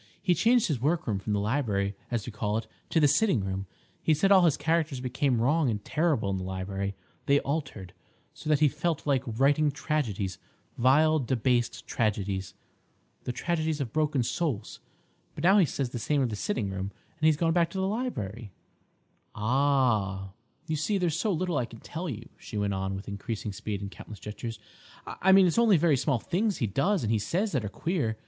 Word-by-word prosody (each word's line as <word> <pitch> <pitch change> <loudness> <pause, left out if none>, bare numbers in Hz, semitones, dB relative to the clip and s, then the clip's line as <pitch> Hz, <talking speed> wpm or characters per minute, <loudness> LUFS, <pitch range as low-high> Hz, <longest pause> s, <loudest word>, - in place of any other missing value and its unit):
He 180 - +2
changed 235 +5 +4
his 140 -7 -1
workroom 145 - 0
from 105 +2 -3
the 100 - +1
library, 105 -3 0
as 115 -4 -2
we 120 - -6
call 105 0 -1
it, 115 - -3 0.2
to 165 - +2
the 150 - +5
sitting 150 - +3
room. 95 0 -3 0.3
He 155 - +3
said 195 +7 +2
all 190 -2 +8
his 150 -3 +3
characters 160 -3 0
became 125 0 0
wrong 145 +4 +2
and 105 -2 -3
terrible 150 -11 +1
in 95 - -1
the - - -5
library; 95 +1 -3 0.3
they 140 0 +5
altered, 135 - -4 0.4
so - - -7
that 150 -1 +3
he 150 - +7
felt 150 +2 -2
like 140 -4 +2
writing 140 +6 +3
tragedies—vile, 140 - 0
debased 125 -1 0
tragedies, 100 -3 -1 0.7
the - - -1
tragedies 160 +3 -1
of 125 -5 -4
broken 150 -4 +1
souls. 120 -5 -2 0.6
But 150 - -6
now 195 +4 +6
he 185 - +6
says 135 -3 -3
the 120 - -4
same 145 +4 +1
of 125 - 0
the 110 - -3
sitting 105 - -2
room, 95 +1 -4 0.3
and 155 - +3
he's 155 -2 +4
gone 165 +1 +2
back 170 -1 +3
to 190 - -7
the 190 - 0
library." 120 - -4 0.8
"Ah!" 110 -6 +1 0.3
"You 160 -1 -2
see, 200 +7 0
there's 175 -5 0
so 200 +5 0
little 180 -2 -1
I 120 - 0
can 115 -1 -13
tell 170 +7 -5
you," 115 -2 -6
she 105 - -7
went 100 -1 0
on, 95 0 -2
with 95 - -7
increasing 105 +1 -4
speed 105 -1 -4
and 100 -1 -5
countless 105 +3 -10
gestures. 110 +2 -6 0.5
"I 190 - +1
mean 190 0 +8
it's 180 +5 +2
only 225 -6 +5
very 160 -2 +3
small 135 0 +1
things 200 - -1
he - - 0
does 150 - +1
and 110 -1 +1
says 195 - 0
that 130 -7 0
are 105 - -3
queer. 140 - -2
130 Hz, 195 wpm, -28 LUFS, 105-160 Hz, 0.8 s, all